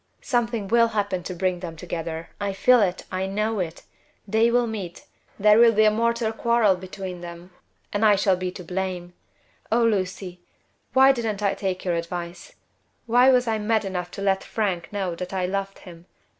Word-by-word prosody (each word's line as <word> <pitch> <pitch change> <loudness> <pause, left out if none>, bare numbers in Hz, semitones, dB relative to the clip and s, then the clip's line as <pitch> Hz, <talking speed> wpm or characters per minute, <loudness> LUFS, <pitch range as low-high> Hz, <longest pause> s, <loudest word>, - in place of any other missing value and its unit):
"Something 235 -5 -1
will 230 +2 +4
happen 205 -4 -2
to 180 +1 -6
bring 180 0 -1
them 170 -2 -7
together. 165 0 -6
I 200 -1 -2
feel 245 +5 +4
it! 185 -2 -1
I 190 0 -2
know 210 +2 -1
it! 170 -2 -4 0.4
They 220 +3 +3
will 240 0 +2
meet 200 -6 -6 0.3
there 210 +2 +5
will 235 -1 +7
be 215 +1 +4
a 215 - +5
mortal 230 +1 0
quarrel 230 -2 +2
between 185 -1 -7
them 175 +1 -10 0.4
and 205 +1 0
I 210 -2 +6
shall 195 -1 +2
be 180 0 -3
to 185 - -9
blame. 180 0 -4 0.6
Oh, 235 +1 +3
Lucy! 185 -4 -1 0.5
why 265 +1 +7
didn't 225 -5 -3
I 200 - +2
take 190 -2 -3
your 180 - +1
advice? 170 - -5 0.5
Why 245 +2 +5
was 250 -1 +4
I 220 -1 0
mad 220 0 +1
enough 180 -2 -4
to 195 - -4
let 195 -1 +1
Frank 185 -6 -2
know 195 -4 -2
that 180 +2 -6
I 185 -1 0
loved 195 +1 -3
him? 175 -2 -14
195 Hz, 185 wpm, -24 LUFS, 180-220 Hz, 0.6 s, will